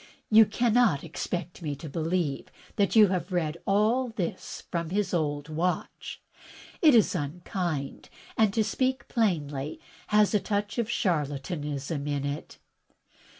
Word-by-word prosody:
You 220 0 +8
cannot 225 - +2
expect 170 +1 -5
me 150 -3 -3
to 150 +3 -9
believe 160 -1 -1 0.3
that 200 +1 +1
you 215 -3 +7
have 180 -1 -2
read 165 -3 -1
all 220 +6 +2
this 195 -7 -5
from 170 -2 -2
his 195 0 -1
old 145 -3 -1
watch! 165 +3 -3 0.6
It 305 -7 +7
is 225 - +4
unkind, 165 -2 -3 0.3
and 220 -2 +3
to 220 +2 +1
speak 260 +4 -1
plainly, 150 - -1 0.3
has 210 0 +3
a 210 - +4
touch 205 +3 -2
of 230 -1 -1
charlatanism 150 - -2
in 145 -1 -1
it." 145 +1 -5
175 Hz, 135 wpm, -28 LUFS, 150-210 Hz, 0.6 s, You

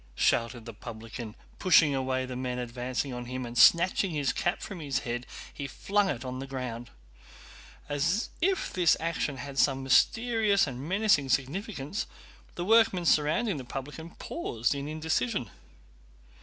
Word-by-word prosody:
shouted 115 - +1
the 115 - -8
publican, 110 +1 -8 0.2
pushing 165 -5 +5
away 130 -1 -1
the 130 0 -6
men 125 0 -3
advancing 125 +2 -3
on 125 0 -5
him, 130 +1 -4
and 120 0 -8
snatching 185 +8 +5
his 145 -5 0
cap 175 - 0
from 195 -4 -7
his 140 -4 -2
head 120 +1 -3 0.3
he 140 - -5
flung 200 +7 0
it 130 -4 -3
on 130 0 -4
the 135 - -6
ground. 125 -3 -5 1.0
As 150 +9 0
if 380 +2 0
this 175 -3 +4
action 160 -4 -2
had 135 +2 -5
some 135 -1 +3
mysterious 220 - +3
and 130 -2 -6
menacing 190 -8 +3
significance, 155 - -2 0.5
the 175 - -3
workmen 210 -5 +4
surrounding 160 +6 +2
the 135 - -6
publican 145 +6 -7
paused 120 - -2
in 140 0 -4
indecision. 135 - -1
140 Hz, 150 wpm, -29 LUFS, 125-175 Hz, 1.0 s, pushing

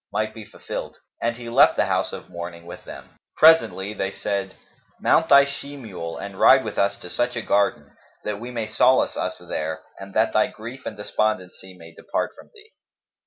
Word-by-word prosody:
might 110 +1 -1
be 110 - -9
fulfilled; - - -7 0.2
and 115 0 0
he 120 0 -9
left 115 - +5
the - - +2
house - - 0
of - - -8
mourning 85 -1 -8
with 85 - -10
them. - - -12 0.2
Presently 155 -11 +5
they 95 -2 -2
said, 100 -1 -3 0.4
"Mount 165 +1 +3
thy 140 -2 +8
she 140 0 -7
mule 90 -10 -7
and 100 -1 -8
ride 130 0 +7
with 110 - -4
us 100 - +2
to - - -7
such 120 +9 -1
a 120 - -2
garden, 90 -8 0 0.3
that 105 -1 -3
we 120 +2 -7
may 115 -3 -3
solace 120 +4 +3
us 90 - -3
there 80 -2 -4 0.2
and 95 0 -10
that 110 +1 +2
thy 110 - +4
grief 120 +4 -9
and 105 - -6
despondency 95 -3 -2
may 85 -1 -13
depart - - -3
from - - -16
thee." 435 0 -18
105 Hz, 195 wpm, -23 LUFS, 95-120 Hz, 0.4 s, thy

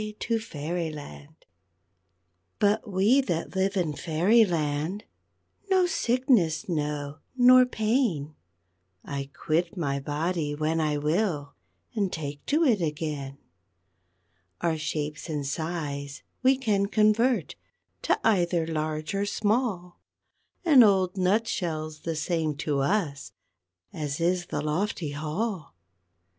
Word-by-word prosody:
TO 230 -1 0
FAIRYLAND 155 -5 -6 1.1
But 210 +2 +1
we 205 +9 +4
that 175 -8 -3
live 190 +1 +1
in 165 -5 0
Fairyland 170 0 +1 0.7
No 375 -2 +4
sickness 250 - +1
know, 150 -3 -3 0.2
nor 255 0 +7
pain; 215 - 0 0.7
I 140 -1 -4
quit 170 +6 -1
my 140 -5 -1
body 150 +1 -2
when 155 +2 0
I 150 -1 0
will, 150 -1 -1 0.4
And 200 -5 0
take 145 -3 -5
to 305 +3 +3
it 230 - +3
again. 150 -3 -3 1.2
_Our 160 -2 0
shapes 150 +1 -4
and 150 -3 -2
size 145 -2 -4 0.2
we 260 +1 +4
can 205 -6 +1
convert 220 +4 +2 0.5
To - - +1
either 175 -5 +2
large 155 0 -3
or 200 +1 0
small, 205 -4 -1 0.7
An 295 -7 +8
old 190 -4 +4
nut 200 +5 +2
shell's 155 -3 -3
the 165 +1 -3
same 155 -1 -1
to 145 -3 +1
us 145 -2 -1 0.6
As 150 0 -3
is 175 +1 +1
the - - -3
lofty 155 0 -1
hall. 155 - -3
170 Hz, 115 wpm, -27 LUFS, 150-210 Hz, 1.2 s, An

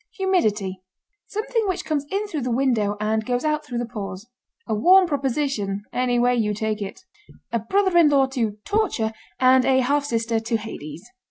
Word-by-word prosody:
HUMIDITY. 215 - 0 0.5
Something 435 +1 -1
which 365 -1 -2
comes 290 -2 -2
in 400 +2 -1
through 325 -8 -4
the 250 - -2
window 230 -5 +1
and 220 +1 0
goes 245 +4 -1
out 305 0 0
through 250 -5 -5
the 240 - -1
pores. 200 -3 -7 0.4
A - - -1
warm 365 - +6
proposition 270 - -1
any 250 -1 +1
way 245 +1 +3
you 210 -3 0
take 215 0 -2
it. 200 - -6 0.5
A 235 - +1
brother 380 - +1
in 335 -3 +6
law 275 -2 +4
to 230 -6 -2
Torture 380 - 0 0.3
and 255 0 +5
a 260 0 +3
half 285 +3 +1
sister 230 -3 0
to 225 +1 -1
Hades. 170 -8 -8
245 Hz, 180 wpm, -23 LUFS, 220-300 Hz, 0.5 s, warm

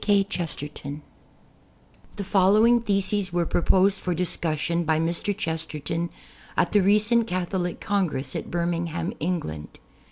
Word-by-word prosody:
K. 205 -2 +4
Chesterton 150 -5 -5 1.1
The 205 - -4
following 210 +5 +4
theses 200 -2 +1
were 175 0 +1
proposed 190 +4 +2
for 180 -2 -1
discussion 170 -1 -1
by 160 -1 +1
Mr. 170 +5 -1
Chesterton 160 -2 -3 0.5
at - - +2
the 205 - +4
recent 215 +4 +3
Catholic 180 -1 -2
Congress 165 -10 -1
at - - -4
Birmingham, 170 0 -2
England. 145 - -3
175 Hz, 120 wpm, -25 LUFS, 165-200 Hz, 1.1 s, K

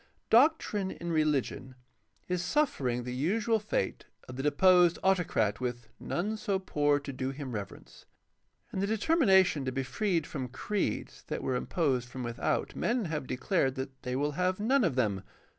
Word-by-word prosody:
— - - -46
Doctrine 240 -10 0
in 170 -2 -5
religion 150 -4 0 0.5
is 180 -1 -1
suffering 140 - 0
the 125 0 -5
usual 215 - +1
fate 205 - -2 0.2
of 125 - -8
the 135 - -3
deposed 175 +4 +5
autocrat 175 - +2
with 120 -2 -4
"none 210 +5 -2
so 200 -2 0
poor 145 -6 +1
to 140 -1 -7
do 130 0 -3
him 135 -1 -6
reverence." 105 -4 -8 0.7
In - - -2
the 200 - 0
determination 205 - +3
to 130 - -2
be 135 +1 -2
freed 170 +3 0
from 130 -4 -4
creeds 195 - -3
that - - -4
were 130 - 0
imposed 125 -2 0
from 130 0 -6
without 120 -1 -2
men 235 -2 0
have 145 -4 -3
declared 135 0 0
that 130 0 -6
they 125 0 -3
will 145 +2 0
have 185 +5 0
none 255 +5 +3
of 170 -9 +1
them. 105 -7 +1
150 Hz, 170 wpm, -30 LUFS, 130-190 Hz, 0.7 s, deposed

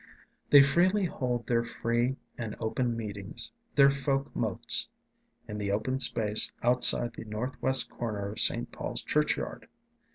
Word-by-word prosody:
They 145 -1 +8
freely 185 +8 +2
hold 125 -7 -3
their 115 -1 +1
free 120 +2 -1 0.2
and 115 -3 -6
open 120 +1 -2
meetings, 105 +1 -5 0.2
their 140 -1 +6
folk 140 0 -2
motes, - - +2 0.6
in 105 0 -6
the 100 -1 -2
open 110 +6 -1
space 110 -4 +2
outside 120 -1 +3
the 115 - -9
northwest 125 +4 -1
corner 105 -4 -4
of 105 - -7
St. - - +2
Paul's - - -3
Churchyard. - - -1
120 Hz, 135 wpm, -29 LUFS, 110-130 Hz, 0.6 s, They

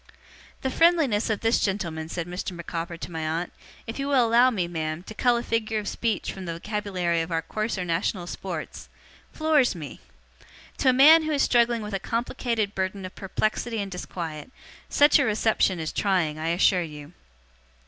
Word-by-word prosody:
'The 265 - -1
friendliness 310 -11 +3
of 220 - -1
this 225 +1 +2
gentleman,' 170 -6 -2
said 170 0 -3
Mr. 180 +2 -5
Micawber 170 0 -5
to 170 - -7
my 160 -1 -4
aunt, 160 +3 -2 0.3
'if 225 +4 -6
you 275 - -2
will 265 -4 +4
allow 235 +3 +5
me, 190 -8 -1
ma'am, 160 -1 -4
to 220 - -9
cull 245 +2 +2
a 235 - -3
figure 220 -2 -1
of 210 -1 -3
speech 225 -4 -2
from 190 -1 -8
the 170 - -3
vocabulary 180 -2 -2
of 165 - -4
our 165 0 0
coarser 215 -1 -3
national 175 +2 -1
sports 175 -2 -6 0.4
floors 310 -8 +2
me. 155 -4 -8 0.8
To 265 - +4
a - - +7
man 295 +6 +8
who 315 0 -2
is 285 -2 +2
struggling 235 -2 +3
with 210 -1 -6
a 195 - -1
complicated 230 -1 -2
burden 190 0 -3
of 185 - -8
perplexity 215 +4 -2
and 200 -1 -4
disquiet, 170 -1 -6 0.4
such 290 +1 +5
a - - +4
reception 215 -5 +1
is 160 -1 -3
trying, 175 -6 0
I 160 - -3
assure 180 +2 +3
you. 150 -1 -8
195 Hz, 185 wpm, -25 LUFS, 170-235 Hz, 0.8 s, man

